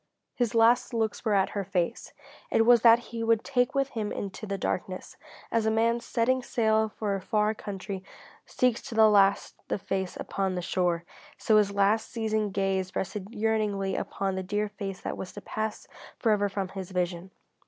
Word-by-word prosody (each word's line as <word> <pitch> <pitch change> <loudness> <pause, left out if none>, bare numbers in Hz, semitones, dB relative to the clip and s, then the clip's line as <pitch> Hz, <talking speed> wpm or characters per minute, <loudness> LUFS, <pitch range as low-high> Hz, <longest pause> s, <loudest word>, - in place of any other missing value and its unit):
His 240 -3 -1
last 240 +2 +4
looks 220 -2 -1
were 215 -3 +2
at 190 -1 +3
her 200 - -2
face. 175 -2 -2 0.4
It 225 - +3
was 240 -1 +6
that 230 0 +8 0.2
he 230 -1 -2
would 225 -1 +2
take 250 -1 +1
with 275 0 +1
him 215 -3 -3
into 200 +2 -5
the 200 0 -2
darkness. 185 0 -3 0.4
As 225 -1 +1
a - - +4
man 230 +2 +2
setting 245 +2 0
sail 220 -3 +1
for 210 -1 -3
a 195 - -2
far 210 +1 +1
country 195 -2 -6 0.4
seeks 250 -2 +1
to 230 - -6
the 220 0 +7
last 200 -1 +4
the - - -1
face 190 -1 -3
upon 190 -1 -2
the 180 - -2
shore, 175 -1 0 0.3
so 220 - +2
his 205 -1 +3
last 200 +2 +2
seeing 220 -2 -1
gaze 190 -1 -1
rested 195 +1 -3
yearningly 210 -3 0
upon 195 -1 -2
the 190 - -2
dear 205 +3 -2
face 195 -2 -6
that - - -4
was 185 0 -7
to 205 - -8
pass 215 +2 -4 0.3
forever 210 -3 +2
from 195 -1 -3
his 190 -2 -7
vision. 180 -1 -2
210 Hz, 185 wpm, -28 LUFS, 195-225 Hz, 0.4 s, that